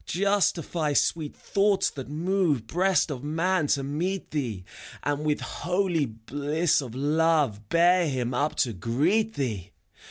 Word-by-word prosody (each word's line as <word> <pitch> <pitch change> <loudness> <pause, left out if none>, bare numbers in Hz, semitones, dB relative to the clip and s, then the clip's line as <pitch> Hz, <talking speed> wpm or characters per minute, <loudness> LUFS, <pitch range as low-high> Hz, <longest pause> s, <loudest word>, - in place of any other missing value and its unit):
Justify 175 -5 0
sweet 155 +1 0
thoughts 200 0 +1
that 135 -2 -8
move 165 - 0
Breast 180 +3 +1
of 135 -2 -6
man 165 +2 0
to 140 -1 +1
meet 170 +7 -3
thee. 120 -11 -3 0.4
And 145 +1 -1
with 150 -1 0
holy 175 -4 -1
bliss 145 +9 -1
of 125 -3 -8
love 145 -7 +1
Bear 175 0 +4
him 125 -2 -2
up 145 +5 0
to 120 -5 0
greet 165 - 0
thee 105 -8 -3
150 Hz, 135 wpm, -26 LUFS, 135-175 Hz, 0.4 s, Bear